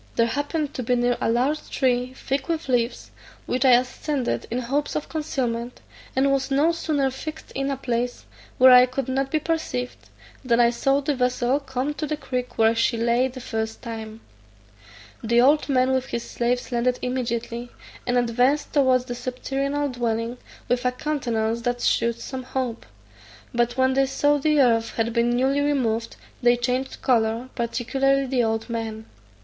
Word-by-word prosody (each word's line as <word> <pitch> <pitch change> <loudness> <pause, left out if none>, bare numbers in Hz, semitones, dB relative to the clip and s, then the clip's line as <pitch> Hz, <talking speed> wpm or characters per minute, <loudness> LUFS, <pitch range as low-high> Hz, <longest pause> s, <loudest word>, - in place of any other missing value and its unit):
There 230 - +4
happened 290 +4 -2
to - - -4
be 250 +1 +1
near 245 0 +2
a - - +1
large 260 +6 0
tree 255 -1 0
thick 270 0 -3
with 330 -2 -2
leaves, 245 -2 -1 0.3
which 255 +1 0
I 260 -2 +6
ascended 255 +2 0
in 235 - -2
hopes 270 +4 -1
of 305 - -2
concealment, 250 -6 -3 0.4
and 275 +1 +3
was 270 -1 0
no 285 +5 +3
sooner 300 -5 0
fixed 310 +4 -8
in 275 +1 -2
a 275 - -2
place 245 -1 -2 0.3
where 260 0 +8
I 250 0 +8
could 255 0 -3
not 265 +1 -1
be 310 - +1
perceived, 305 -6 -3 0.3
than 240 -2 +2
I 235 0 +5
saw 270 +3 +1
the 290 +1 0
vessel 250 +1 +1
come 265 +1 -3
to 305 +1 -4
the 305 +1 -2
creek 250 -3 -4
where 225 0 +4
she 230 +1 +1
lay 235 +2 +2
the 260 0 -9
first 225 -3 -4
time. 220 -2 -7 1.0
The 235 +1 +3
old 290 +5 +4
man 260 -1 +3
with 260 0 0
his 235 - -4
slaves 245 +2 -1
landed 245 +1 +1
immediately, 240 -1 -3 0.4
and 245 0 +2
advanced 245 +5 +1
towards 260 -4 +3
the 245 - -4
subterranean 270 +3 -2
dwelling, 235 0 -2 0.3
with 245 0 0
a 250 - +2
countenance 235 -6 -1
that 245 +1 -1
shewed 235 0 +1
some 260 +1 -5
hope; 255 -2 -4 0.7
but 240 +1 0
when 260 0 +3
they 270 0 +3
saw 290 +2 +2
the 300 0 +3
earth 230 -3 +2
had 230 0 0
been 235 0 +2
newly 265 +4 +2
removed, 235 -6 0 0.3
they 240 0 +4
changed 250 +2 -2
colour, 230 0 +1
particularly 270 +3 0
the 255 -2 +1
old 225 0 -1
man. 225 -2 -4
250 Hz, 175 wpm, -24 LUFS, 235-275 Hz, 1.0 s, where